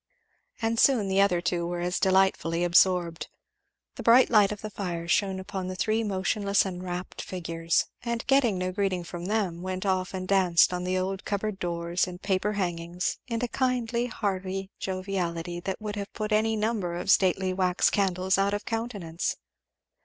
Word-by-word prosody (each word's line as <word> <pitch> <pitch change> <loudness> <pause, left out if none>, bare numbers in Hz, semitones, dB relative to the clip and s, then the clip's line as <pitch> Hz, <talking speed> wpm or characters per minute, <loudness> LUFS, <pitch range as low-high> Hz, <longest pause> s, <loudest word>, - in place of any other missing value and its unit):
And 225 0 +1
soon 230 -8 +4
the 190 +1 +3
other 180 -3 +3
two 175 -1 -1
were 175 0 -3
as 180 +1 -1
delightfully 190 -3 +2
absorbed. 175 -1 +3 0.7
The - - -5
bright 240 +2 +6
light 210 -3 +5
of 210 - -6
the 215 - -6
fire 175 -4 -4
shone 190 +1 +1
upon 190 0 -5
three 215 +5 0
motionless 200 0 +1
and 180 -1 -5
rapt 180 0 -5
figures, 165 -2 -1 0.2
and 235 -1 -3
getting 270 -7 +3
no 185 0 -2
greeting 190 -2 -1
from 175 0 -7
them 195 -4 -1
went 185 +1 -4
off 185 -1 0
and 185 0 -4
danced 185 -3 +4
on 180 0 -3
the 185 +1 0
old 190 +1 -2
cupboard 205 -1 -2
doors 170 0 -1
and 180 0 -8
paper 195 +1 0
hangings, 175 -2 -2
in 230 -1 -2
a - - +1
kindly 245 -2 0
hearty 195 -3 -3
joviality 180 -3 -3
that 190 +2 -4
would 210 -1 -5
have 200 0 -5
put 215 -1 -4
any 220 +1 +2
number 210 -5 -1
of 180 +2 0
stately 185 0 +3
wax 185 -1 +2
candles 190 -1 +1
out 200 +1 +2
of 205 - -5
countenance. 205 -8 -3
190 Hz, 175 wpm, -27 LUFS, 180-210 Hz, 0.7 s, bright